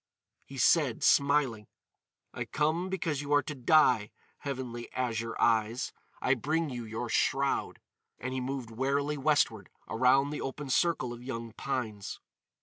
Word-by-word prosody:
He 135 Hz, -, -9 dB
said, 135 Hz, -1 st, +3 dB
smiling: 140 Hz, -7 st, +3 dB, 0.7 s
"I -, -, -4 dB
come 155 Hz, +6 st, 0 dB
because 165 Hz, -6 st, -1 dB
you 145 Hz, 0 st, -6 dB
are 145 Hz, -, +4 dB
to 150 Hz, -, -5 dB
die, 125 Hz, -5 st, +4 dB, 0.3 s
Heavenly 125 Hz, -4 st, -5 dB
Azure 115 Hz, -2 st, -2 dB
Eyes. 115 Hz, +1 st, +1 dB, 0.3 s
I 130 Hz, -, +4 dB
bring 155 Hz, +4 st, -1 dB
you 120 Hz, -2 st, -5 dB
your 110 Hz, +2 st, -4 dB
shroud." 135 Hz, +4 st, 0 dB, 0.4 s
And 130 Hz, +1 st, -4 dB
he 130 Hz, -, -2 dB
moved 130 Hz, -2 st, -4 dB
warily 140 Hz, +5 st, 0 dB
westward 135 Hz, -, +1 dB, 0.2 s
around 130 Hz, +5 st, +3 dB
the 150 Hz, -, -4 dB
open 135 Hz, 0 st, -4 dB
circle 130 Hz, -6 st, +1 dB
of 120 Hz, -, -10 dB
young 115 Hz, -2 st, -5 dB
pines. 110 Hz, -5 st, -4 dB
130 Hz, 145 wpm, -30 LUFS, 115-145 Hz, 0.7 s, are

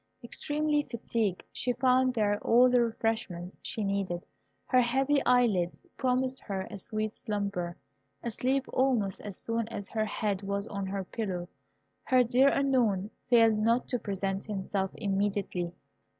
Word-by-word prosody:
Extremely 295 Hz, +4 st, 0 dB
fatigued, 225 Hz, -5 st, -1 dB
she 250 Hz, -, 0 dB
found 255 Hz, 0 st, +3 dB
there 205 Hz, -2 st, +2 dB
all 245 Hz, +2 st, +5 dB
the 250 Hz, -1 st, +5 dB
refreshments 225 Hz, -6 st, -2 dB
she 220 Hz, -, -3 dB
needed. 195 Hz, -3 st, -1 dB, 0.4 s
Her 255 Hz, -1 st, +4 dB
heavy 270 Hz, +4 st, +2 dB
eyelids 220 Hz, -9 st, +3 dB, 0.2 s
promised 260 Hz, 0 st, 0 dB
her 195 Hz, -2 st, -4 dB
a 200 Hz, -, -6 dB
sweet 215 Hz, +2 st, -3 dB
slumber. 200 Hz, -5 st, -3 dB, 0.5 s
Asleep 255 Hz, +4 st, 0 dB
almost 245 Hz, -7 st, +1 dB
as 200 Hz, -3 st, -7 dB
soon 230 Hz, -1 st, -2 dB
as 205 Hz, -4 st, -6 dB
her 220 Hz, -1 st, 0 dB
head 205 Hz, -2 st, -1 dB
was 200 Hz, 0 st, -2 dB
on 200 Hz, -3 st, -4 dB
her 195 Hz, 0 st, -2 dB
pillow, 185 Hz, -3 st, -4 dB, 0.6 s
her 255 Hz, -1 st, +5 dB
dear 250 Hz, +3 st, +4 dB
Unknown 235 Hz, -8 st, +1 dB, 0.2 s
failed 225 Hz, -3 st, +5 dB
not 230 Hz, +3 st, +2 dB
to 245 Hz, -, 0 dB
present 195 Hz, -2 st, -2 dB
himself 195 Hz, -1 st, -2 dB
immediately. 195 Hz, -4 st, -1 dB
215 Hz, 140 wpm, -30 LUFS, 195-250 Hz, 0.6 s, all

